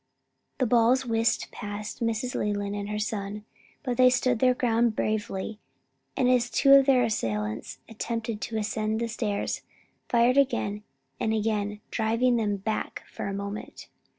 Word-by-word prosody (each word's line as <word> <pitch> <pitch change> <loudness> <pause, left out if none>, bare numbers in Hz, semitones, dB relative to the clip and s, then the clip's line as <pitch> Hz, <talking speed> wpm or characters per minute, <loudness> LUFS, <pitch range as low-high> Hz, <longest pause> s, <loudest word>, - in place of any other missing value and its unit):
The 255 - +2
balls 245 +3 +4
whistled 230 -1 +1
past 205 +1 -6
Mrs. 230 +2 -1
Leland 205 -1 -1
and 205 0 -4
her 210 - -2
son, 210 -1 -3 0.4
but 250 -4 -2
they 255 0 +7
stood 250 -1 +1
their 255 0 +4
ground 235 -2 +2
bravely, 215 -1 -2 0.6
and 250 - +3
as 250 -1 +3
two 275 +2 +5
of 275 0 +7
their 255 -2 +5
assailants 110 - -2
attempted 230 -1 -4
to 225 - -3
ascend 215 0 -1
the 235 - -1
stairs; 215 -3 -2 0.5
fired 240 +2 +4
again 210 -7 +1 0.4
and 220 0 +1
again 210 -1 -1
driving 235 +2 +2
them 205 -3 0
back 215 +3 -3
for - - -6
a 195 - -3
moment. 200 +1 -6
220 Hz, 150 wpm, -27 LUFS, 210-245 Hz, 0.6 s, they